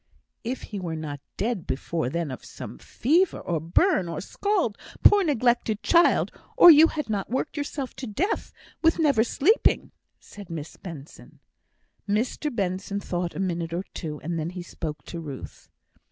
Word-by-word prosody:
"If 250 Hz, +3 st, -4 dB
he 205 Hz, -, -6 dB
was 165 Hz, -3 st, -4 dB
not 150 Hz, -2 st, -5 dB, 0.2 s
dead 220 Hz, -4 st, -2 dB
before 160 Hz, 0 st, -2 dB
then 170 Hz, 0 st, -2 dB
of 130 Hz, -, -8 dB
some 60 Hz, -, -9 dB
fever, 330 Hz, -, +1 dB
or 170 Hz, -3 st, -2 dB
burn, 175 Hz, -, +2 dB
or 165 Hz, -, -4 dB
scald, 370 Hz, -, 0 dB, 0.3 s
poor 410 Hz, -1 st, +7 dB
neglected 240 Hz, -, +1 dB
child; 340 Hz, 0 st, +4 dB, 0.3 s
or 350 Hz, -, +11 dB
you 315 Hz, +1 st, +8 dB
had 305 Hz, -2 st, -4 dB
not 205 Hz, -3 st, -2 dB
worked 260 Hz, +6 st, -2 dB
yourself 285 Hz, -2 st, -4 dB
to 260 Hz, -, -5 dB
death 335 Hz, -, -1 dB, 0.3 s
with 325 Hz, 0 st, +4 dB
never 285 Hz, -9 st, +4 dB
sleeping," 305 Hz, -, +2 dB, 0.3 s
said 205 Hz, -3 st, -12 dB
Miss 160 Hz, -2 st, -6 dB
Benson. 165 Hz, -6 st, -11 dB, 0.7 s
Mr 235 Hz, +8 st, 0 dB
Benson 200 Hz, -2 st, -2 dB
thought 175 Hz, -3 st, -3 dB
a -, -, -4 dB
minute 170 Hz, -3 st, -2 dB
or 180 Hz, -, -2 dB
two, 150 Hz, -4 st, -5 dB
and 165 Hz, +1 st, -3 dB
then 160 Hz, +1 st, -2 dB
he 180 Hz, 0 st, -7 dB
spoke 160 Hz, -3 st, -6 dB
to 170 Hz, -, -7 dB
Ruth. 145 Hz, -5 st, -9 dB
200 Hz, 165 wpm, -26 LUFS, 170-280 Hz, 0.7 s, or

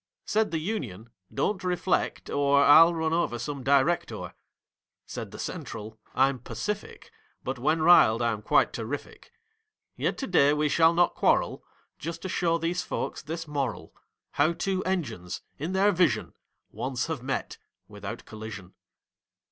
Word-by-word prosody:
Said 220 Hz, 0 st, +1 dB
the 165 Hz, -, -1 dB
Union: 125 Hz, -, -4 dB, 0.2 s
"Don't 195 Hz, -2 st, -1 dB
reflect, 180 Hz, 0 st, 0 dB
or 140 Hz, 0 st, +3 dB
I'll 165 Hz, +4 st, +8 dB
run 160 Hz, 0 st, 0 dB
over 165 Hz, -8 st, 0 dB
some 140 Hz, +3 st, -5 dB
Director." 140 Hz, +6 st, +1 dB, 0.7 s
Said -, -, -6 dB
the -, -, -10 dB
Central: 110 Hz, +1 st, -6 dB, 0.2 s
"I'm 135 Hz, 0 st, +3 dB
Pacific; 210 Hz, -, -5 dB, 0.3 s
But, 130 Hz, 0 st, -4 dB
when 155 Hz, +5 st, +1 dB
riled, 115 Hz, -10 st, +7 dB
I'm 115 Hz, -3 st, 0 dB
quite -, -, +3 dB
terrific. -, -, -6 dB, 0.6 s
Yet -, -, -1 dB
to 270 Hz, -, -3 dB
day 145 Hz, -, +4 dB
we 150 Hz, 0 st, +1 dB
shall 165 Hz, +2 st, +4 dB
not 175 Hz, 0 st, +3 dB
quarrel, -, -, +1 dB, 0.4 s
Just 165 Hz, +1 st, -6 dB
to 190 Hz, -, -4 dB
show 165 Hz, -1 st, +1 dB
these 170 Hz, +2 st, -1 dB
folks -, -, -4 dB
this 165 Hz, +2 st, -6 dB
moral, 135 Hz, -9 st, -3 dB, 0.4 s
How 170 Hz, -, +2 dB
two 190 Hz, +2 st, -1 dB
Engines—in 150 Hz, -, -4 dB
their 195 Hz, +2 st, +4 dB
vision— 180 Hz, -7 st, +1 dB, 0.4 s
Once 130 Hz, -1 st, -2 dB
have 160 Hz, -6 st, -4 dB
met 135 Hz, +2 st, -3 dB, 0.3 s
without -, -, -8 dB
collision." 105 Hz, -4 st, -9 dB
155 Hz, 140 wpm, -27 LUFS, 125-175 Hz, 0.7 s, I'll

